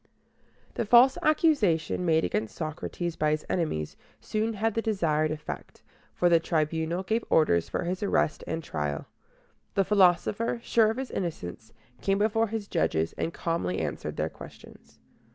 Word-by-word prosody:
The - - -2
false 245 +4 +7
accusation 215 - +2
made 160 -1 +3
against 110 0 -2
Socrates 165 +2 -4
by 155 - +1
his 155 0 -1
enemies 155 - -2 0.2
soon 215 - -2
had 220 +1 0
the 225 - 0
desired 165 -9 +1
effect, 150 -1 -7 0.3
for 175 - +3
the 170 -1 +5
Tribunal 160 +2 -1
gave 220 +4 0
orders 85 - +3
for - - -2
his 180 +2 -3
arrest 200 -6 +1
and 165 0 -3
trial. 75 - -3 0.7
The 195 - +3
philosopher, 200 +4 +3
sure 225 -2 +3
of 225 - -2
his 265 -1 -4
innocence, 115 - -5 0.3
came 195 0 +1
before 225 +2 +2
his 215 -1 -4
judges, 80 - 0
and 165 - -3
calmly 165 - -2
answered - - -4
their - - 0
questions. - - -14
175 Hz, 150 wpm, -28 LUFS, 155-215 Hz, 0.7 s, false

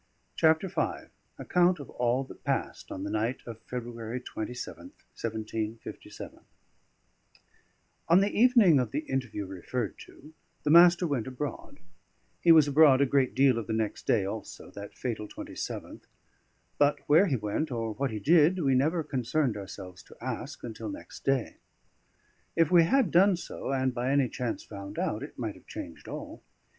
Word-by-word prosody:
CHAPTER 160 +4 +3
V 185 - -3 0.3
ACCOUNT 180 0 +2
OF 145 - -9
ALL 125 +2 0
THAT - - -13
PASSED - - -3
ON 95 - -5
THE 100 - -4
NIGHT 110 +4 -1
OF 115 -1 -9
FEBRUARY 120 -1 -5
27TH, 125 - -7
1757 110 0 -6 1.7
On 170 +2 +6
the 200 +1 0
evening 225 - +6
of 125 -3 0
the 145 +7 -2
interview 125 -6 -3
referred 95 +4 -4
to, 150 +3 -14 0.3
the 150 - +1
Master 175 +2 +7
went 140 -8 -1
abroad; 130 +3 -6 0.6
he 170 - +6
was 155 -3 +7
abroad 145 -2 +6
a - - +5
great 135 -1 +1
deal 130 -3 +4
of 115 - -6
the 110 - -2
next 110 -1 -2
day 100 - +3
also, 105 +3 -7
that 100 0 -10
fatal 110 -4 -3
27th; - - -7 0.8
but 145 0 +3
where 160 +7 +6
he 140 - +1
went, 105 +7 -2
or 115 -3 -3
what 135 +4 -1
he 110 - -4
did, 160 - +4
we 140 -7 +2
never 155 +6 +2
concerned 135 -2 -1
ourselves 95 -2 -9
to - - -17
ask - - -5
until 115 - -6
next 300 0 -10
day. 135 -3 0 1.0
If 165 -1 +3
we 170 -2 +7
had 255 0 +2
done 190 +1 +5
so, 170 - -6
and 130 -1 0
by 125 +1 -2
any 140 -2 +2
chance 120 -3 -3
found 100 -1 -9
out, - - -1
it - - -9
might - - -3
have - - -19
changed - - -8
all. - - -7
130 Hz, 165 wpm, -29 LUFS, 115-160 Hz, 1.7 s, Master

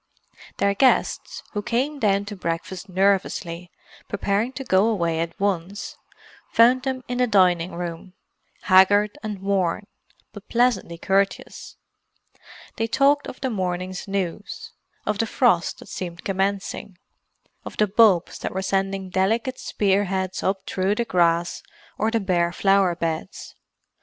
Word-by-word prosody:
Their 200 0 +2
guests, 255 +6 +1
who 205 - -2
came 265 +7 -1
down 200 -3 +2
to 205 0 -6
breakfast 180 +2 -4
nervously, 185 -2 0 0.4
preparing 205 +5 -1
to 270 - -5
go 195 -3 +3
away 170 -7 0
at 165 0 -4
once, 195 0 -2 0.5
found 245 +3 +5
them 260 -1 -3
in 245 0 -3
the 250 - +3
dining 180 -4 +3
room, 175 +1 -6 0.5
haggard 205 +2 +5
and 215 -2 -4
worn, 195 -1 0 0.5
but 205 -1 -12
pleasantly 235 -8 +1
courteous; 195 +3 -1 1.0
they 225 - 0
talked 275 +4 +3
of - - -9
the 260 -2 -1
morning's 185 -1 -3
news, 195 0 -4 0.3
of 205 - -1
the 225 - +1
frost 215 -8 +2
that - - -13
seemed 175 -1 -6
commencing, 195 -1 -2 0.7
of - - -9
the 210 - +4
bulbs 200 -4 +3
that - - -4
were 190 - -1
sending 195 -1 -1
delicate 225 +7 0
spear 200 0 +1
heads 190 -1 -2
up 190 0 -1
through 190 +2 0
the 235 - -1
grass 170 -3 +1 0.4
or 220 - +2
the 230 0 +1
bare 175 -4 +1
flower 195 -1 +3
beds. 165 -2 -4
195 Hz, 140 wpm, -23 LUFS, 180-215 Hz, 1.0 s, found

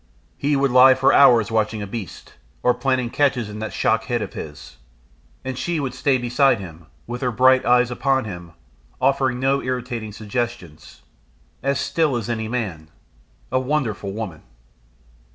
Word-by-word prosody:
He 145 +1 0
would 135 -1 +1
lie 130 +1 +7
for 130 - +3
hours 120 -6 +5
watching 110 -1 0
a - - -4
beast, 100 -1 -8 0.3
or 125 - +4
planning 130 -3 -1
catches 125 -7 0
in 105 - -7
that 110 - -4
shock 110 0 0
head 120 -2 -1
of 100 - -8
his, 70 -5 -9 0.7
and 130 0 -3
she 165 +6 -2
would 135 -3 -3
stay 130 +1 +1
beside 125 0 +2
him, 85 -4 -11 0.2
with 120 +1 -6
her 125 - 0
bright 130 +2 +4
eyes 125 0 +4
upon 135 0 0
him, 85 -5 -8 0.5
offering 135 -3 +1
no 135 +1 +1
irritating 125 -3 -4
suggestions 105 - -6 0.6
as 140 0 0
still 155 -4 0
as 120 -1 -3
any 110 -2 -3
man. 100 -10 -4 0.6
A 130 - +2
wonderful 125 -8 -2
woman! 95 -7 -6
120 Hz, 160 wpm, -21 LUFS, 105-130 Hz, 0.7 s, lie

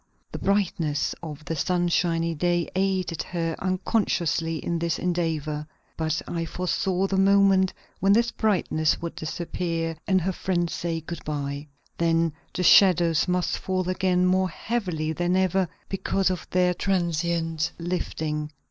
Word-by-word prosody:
The - - -5
brightness 175 -7 0
of 155 -2 -8
the 165 - -2
sunshiny 170 0 +1
day 175 +1 +1
aided 185 -3 0
her 165 -2 -2
unconsciously 180 -4 0
in 170 +1 -2
this 170 -1 0
endeavor. 155 -4 -1 0.3
But 160 -1 -1
I 170 -1 -2
foresaw 185 +2 -1
the 195 0 0
moment 195 -1 +4 0.3
when 195 - +3
this 235 +2 +3
brightness 175 -7 +1
would 170 0 -5
disappear 165 0 -3
and 190 -1 +4
her 190 +3 0
friends 175 -2 -1
say 165 -1 -2
good 170 +1 -7
by. 145 -1 -4 0.3
Then 165 -1 +2 0.2
the 180 - -2
shadows 175 -4 +5
must 180 0 0
fall 185 -1 -1
again 185 0 +2
more 185 0 +2
heavily 175 -7 -2
than 175 +2 0
ever, 185 -1 +2 0.2
because 195 0 0
of 180 - -4
their 180 0 +3
transient 170 -3 0
lifting. 155 -3 -3
175 Hz, 140 wpm, -25 LUFS, 165-185 Hz, 0.3 s, shadows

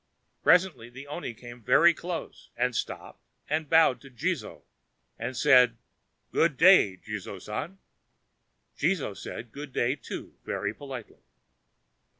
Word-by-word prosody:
Presently 180 -10 +3
the 130 +3 -10
oni 145 -4 -6
came 120 +1 -11
very 150 +9 +5
close, 170 0 -7
and - - 0
stopped - - -5 0.2
and 155 0 -1
bowed 160 -5 +5
to 135 - -13
Jizō, 120 -4 -3 0.6
and 120 +2 -4
said: 125 -4 +5 0.5
"Good 160 -5 +2
day, 165 - +6
Jizō - - -7
San!" 145 - -5 1.0
Jizō 145 - 0
said 115 +3 -8
good 145 +2 -8
day, 125 +2 +1
too, 130 - -8
very - - -3
politely. 130 -5 -9
135 Hz, 125 wpm, -28 LUFS, 120-160 Hz, 1.0 s, day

